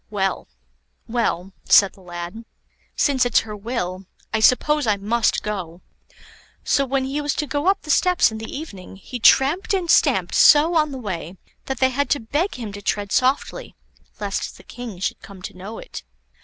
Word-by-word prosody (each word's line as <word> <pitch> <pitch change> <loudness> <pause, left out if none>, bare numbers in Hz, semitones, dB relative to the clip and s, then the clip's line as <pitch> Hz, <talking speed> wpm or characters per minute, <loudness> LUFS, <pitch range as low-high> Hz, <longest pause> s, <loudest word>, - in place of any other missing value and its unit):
"Well, 195 -2 -2 0.6
well," 195 -6 -1
said 200 -1 +6
the 195 - -19
lad, 175 +4 -7 0.5
"since 275 -3 +2
it's 245 -3 +3
her 215 -1 -8
will, 195 -4 -4 0.3
I 220 - +2
suppose 290 +4 +3
I 210 -2 +2
must 220 +3 0
go." 185 -5 -5 0.8
So, 275 -1 +1
when 270 0 0
he 280 +3 -2
was 290 0 -1
to 300 - -1
go 290 +3 -2
up 390 - +2
the 305 - -2
steps 360 - +3
in 220 - -6
the 225 - -7
evening, 200 - -8
he 245 +6 -8
tramped 320 - +4
and 355 -3 0
stamped - - +3
so 305 +3 +6
on 305 -2 +2
the 270 - -5
way, 185 -6 -6 0.3
that 265 - -3
they 260 0 +3
had 280 +1 -1
to 285 - +2
beg 295 - -2
him 225 -5 -6
to 205 - -8
tread 205 0 -2
softly 275 - 0 0.4
lest 205 -1 -3
the - - -16
King 240 -5 -8
should 190 - -3
come 195 -2 -13
to - - -7
know 195 +5 -8
it. - - -8
230 Hz, 185 wpm, -22 LUFS, 200-285 Hz, 0.8 s, said